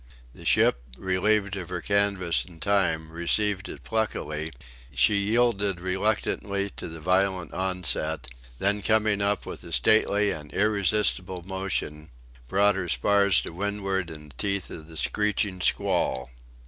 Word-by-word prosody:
The - - -13
ship - - +4 0.2
relieved 100 +2 +1
of 90 -3 -6
her 90 -1 -3
canvas 100 -3 +1
in 85 -3 -15
time 80 -5 +1
received 95 +4 0
it - - -9
pluckily: 80 -8 -2 0.4
she 65 +7 +5
yielded 100 -2 +1
reluctantly 100 +1 -1
to - - -5
the 80 0 -8
violent 95 +2 +1
onset; 90 -6 -1 0.3
then 100 +5 +1
coming 110 -1 +2
up 100 0 +1
with - - -8
a - - -10
stately 105 - +3
and 75 -1 -7
irresistible 100 -3 +1
motion, 95 -5 -3 0.4
brought 100 +5 +3
her 95 -2 -3
spars 100 0 +3
to - - -7
windward 95 -1 -2
in 75 -2 -10
the 70 - -17
teeth 100 -2 -1
of 80 -2 -9
the 80 -1 -10
screeching 100 +2 0
squall. 65 -7 0
95 Hz, 140 wpm, -26 LUFS, 85-100 Hz, 0.4 s, she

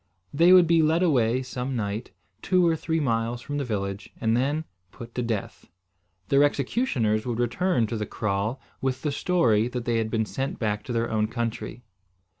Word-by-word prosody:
They 170 +5 +5
would 185 -1 +8
be 165 0 +4
led 160 +3 +3
away 130 -6 +2
some 125 +1 -4
night, 105 0 -3 0.3
two 185 -1 +3
or 165 -1 +3
three 160 +1 -1
miles 115 -3 0
from 145 +4 -4
the - - -1
village 100 -4 -4
and 115 0 +1
then 145 +6 0 0.3
put 115 +1 -10
to 125 - -2
death. 115 -4 -4 0.6
Their 140 +1 +5
executioners 130 - +1
would 120 -2 -2
return 120 +2 +1
to 110 +1 -3
the 105 -1 -3
kraal 105 +4 -2 0.2
with 130 -1 -2
the 150 - 0
story 120 -9 +2
that 125 -1 -5
they 115 -1 +1
had 110 -1 -1
been 110 -1 0
sent 135 +5 -3
back 105 -2 -1
to - - -5
their 115 0 -1
own 110 -1 +1
country. 115 +1 -4
120 Hz, 190 wpm, -26 LUFS, 110-145 Hz, 0.6 s, would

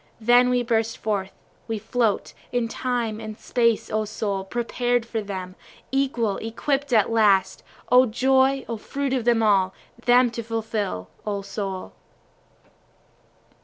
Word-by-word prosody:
Then 245 +2 +5
we 250 -1 +2
burst 225 -1 0
forth, 200 -3 -2 0.4
we 225 -1 -2
float, 225 -1 -1 0.2
In 245 -2 0
Time 235 -2 -2
and 215 -1 -7
Space 230 -3 +1
O 215 0 +1
soul, 205 -2 -3
prepared 240 +3 -1
for 225 -1 -3
them, 190 -3 -6 0.4
Equal, 250 -7 0
equipt 270 +5 -2
at 220 -2 +3
last, 205 -4 +3 0.3
(O 255 +1 +7
joy! 265 +3 +2
O 230 - -3
fruit 275 +5 -3
of 240 -2 +2
all!) 190 -3 +3 0.3
them 245 0 +5
to 235 - -4
fulfil 220 - -3 0.2
O 200 -2 -3
soul. 195 -2 -5
225 Hz, 130 wpm, -24 LUFS, 210-245 Hz, 0.4 s, O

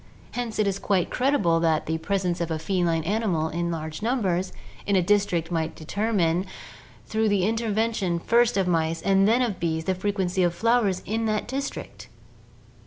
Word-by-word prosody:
Hence 240 -3 -4
it 215 - +2
is 195 -1 -1
quite 190 -4 0
credible 225 -11 +2
that 160 -2 +1
the 160 +1 -2
presence 180 -1 -1
of 170 - -1
a 160 - -1
feline 165 -1 0
animal 185 -5 0
in 170 +2 -2
large 160 0 -5
numbers 195 -6 0 0.4
in 200 - +2
a 185 - +4
district 180 -4 +1
might 165 -1 -1
determine, 185 0 0 0.6
through 220 0 0
the 200 -3 +2
inter 225 0 -1
vention 205 -5 0
first 235 +4 +3
of 190 -2 +1
mice 165 -1 0
and 195 0 +4
then 240 +4 +3
of 220 -6 -2
bees, 160 -1 -1
the 190 - +1
frequency 190 -1 -1
of 175 -1 +2
flowers 225 -3 +1
in 225 +2 -1
that 215 -1 -1
district 275 +2 -5
190 Hz, 175 wpm, -25 LUFS, 170-220 Hz, 0.6 s, a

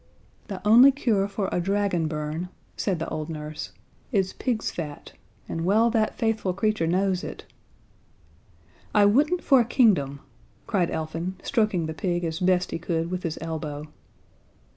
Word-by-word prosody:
"The 200 0 -5
only 245 +6 +8
cure 225 -8 +1
for 200 -1 -2
a 180 - 0
dragon 195 -3 0
burn," 155 +3 -4 0.3
said 190 -4 -1
the 165 - -4
old 155 0 -4
nurse, 155 -1 -6 0.4
"is 195 -5 +1
pig's 240 -4 -2
fat, 150 -4 -7 0.4
and 165 - -3
well 220 +6 +3
that 220 -2 +1
faithful 225 -5 0
creature 215 -4 +1
knows 185 +1 +1
it - - -7 0.8
" 85 +2 -26
"I 205 -1 +6
wouldn't 295 - +3
for 270 - +5
a - - +3
kingdom," 185 - +2 0.4
cried 185 -6 +1
Elfin, 165 +3 -3
stroking 215 -9 +1
the 160 - -4
pig 175 +1 -1
as 165 0 -2
best 180 -1 +2
he - - -3
could 165 0 -2
with 185 -1 -2
his 165 -3 -3
elbow. 155 -2 -4
180 Hz, 160 wpm, -25 LUFS, 160-210 Hz, 0.8 s, only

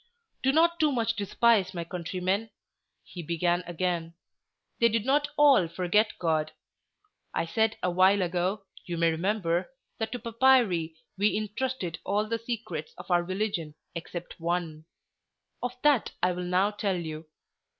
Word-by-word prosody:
"Do 265 - +3
not 335 +3 +3
too 305 -2 +3
much 230 -3 0
despise 205 -2 +2
my 170 - -2
countrymen," 185 +5 -2 0.5
he 180 - -8
began 175 +2 0
again. 175 -1 -2 0.6
"They 235 - +5
did 225 0 0
not 290 +2 +2
all 280 - +6
forget 185 +6 +1
God. 155 -2 0 0.8
I - - +1
said 220 +6 +1
awhile 185 +2 +4
ago, 180 +3 -1 0.2
you 175 -2 -4
may 165 0 +3
remember, 175 +1 0 0.3
that 220 0 -2
to - - -2
papyri 230 -9 +3 0.2
we 210 +1 +3
intrusted 215 -4 -3
all 205 +2 0
the 230 +1 -2
secrets 220 -10 -5
of - - -8
our 175 0 +4
religion 185 -5 -3 0.2
except 175 +1 -7
one; 165 -2 -2 0.8
of 250 0 -4
that 290 -6 +3
I 180 - +4
will 180 0 -4
now 185 +3 +2
tell 205 -3 -1
you. 160 -2 -6
185 Hz, 145 wpm, -28 LUFS, 170-225 Hz, 0.8 s, all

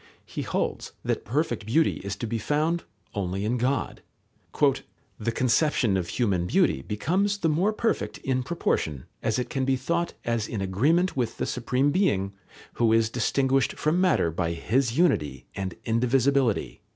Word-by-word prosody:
He - - -5
holds - - -2
that - - -2
perfect 120 -3 -1
beauty 155 +8 +2
is 100 0 -5
to 115 - -4
be 115 0 -2
found 155 +8 0 0.3
only 95 0 -2
in 120 +3 0
God. 130 +3 -1 1.2
"The 115 +2 -1
conception 125 -2 +2
of 90 -2 -1
human 95 -4 0
beauty 65 - +2
becomes 180 - 0
the 170 -5 +1
more 175 +8 +2
perfect 225 +1 -1
in 130 -1 -1
proportion 80 - -1 0.2
as 110 - 0
it 125 - -3
can 135 - -1
be 135 0 +2
thought 170 +7 -1
as 115 -2 0
in 110 - -4
agreement 145 - +2
with 125 -4 -1
the - - -1
Supreme 125 +3 0
Being, 100 - +1 0.4
who 115 -2 +2
is 115 0 +3
distinguished 135 +3 +1
from 160 +4 +1
matter 170 - +3
by 85 0 -1
His 120 +8 0
unity 75 - +1
and 95 -2 -4
indivisibility." 125 +1 +1
125 Hz, 160 wpm, -26 LUFS, 105-150 Hz, 1.2 s, is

